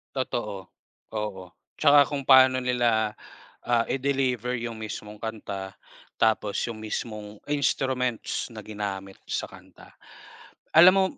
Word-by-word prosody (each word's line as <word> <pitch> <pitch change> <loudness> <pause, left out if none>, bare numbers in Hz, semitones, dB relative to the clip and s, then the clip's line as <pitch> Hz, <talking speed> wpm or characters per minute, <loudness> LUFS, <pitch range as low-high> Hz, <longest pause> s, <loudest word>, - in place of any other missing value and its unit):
Totoo, 105 -7 -3 0.4
oo, 105 -4 -4 0.3
tsaka 145 -1 +6
kung 140 -2 -3
paano 130 -1 +6
nila, 120 -4 +2 0.6
ah, 120 -1 +3
i-deliver 130 -3 0
yung 115 -1 -5
mismong 105 -1 -7
kanta, 100 -3 -6 0.4
tapos 110 -2 +1
yung 115 -2 -6
mismong 105 -1 -5
instruments 130 -4 0
na 110 -1 -8
ginamit 100 -2 -5
sa - - -3
kanta. - - -16 0.8
Alam 175 +3 +9
mo, 195 - +4
115 Hz, 115 wpm, -26 LUFS, 105-130 Hz, 0.8 s, Alam